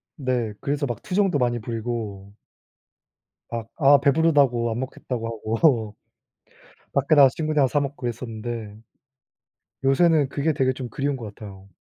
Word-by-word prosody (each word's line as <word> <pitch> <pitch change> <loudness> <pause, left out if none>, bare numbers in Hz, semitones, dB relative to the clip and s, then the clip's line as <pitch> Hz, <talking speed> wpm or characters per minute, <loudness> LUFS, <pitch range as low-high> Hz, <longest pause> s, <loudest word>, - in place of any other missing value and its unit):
네 125 -6 -2
그래서 145 +1 -1
막 120 -3 -4
투정도 190 -4 +1
많이 120 -1 +1
부리고 110 -3 -5 1.2
막 115 -1 -5
아 140 -2 +6
배부르다고 140 -5 +3
안 115 - -3
먹겠다고 125 -2 -5
하고 115 0 +1 1.0
밖에 140 +3 +3
나가서 135 -3 +7
친구들이랑 155 -4 +1
사 145 - +1
먹고 140 0 -3
그랬었는데 115 -2 -5 1.1
요새는 145 +1 +3
그게 150 +3 0
되게 130 -2 +1
좀 125 -1 -6
그리운 140 +2 -2
것 110 -5 -8
같아요. 100 -2 -11
125 Hz, 305 characters per minute, -24 LUFS, 115-140 Hz, 1.2 s, 나가서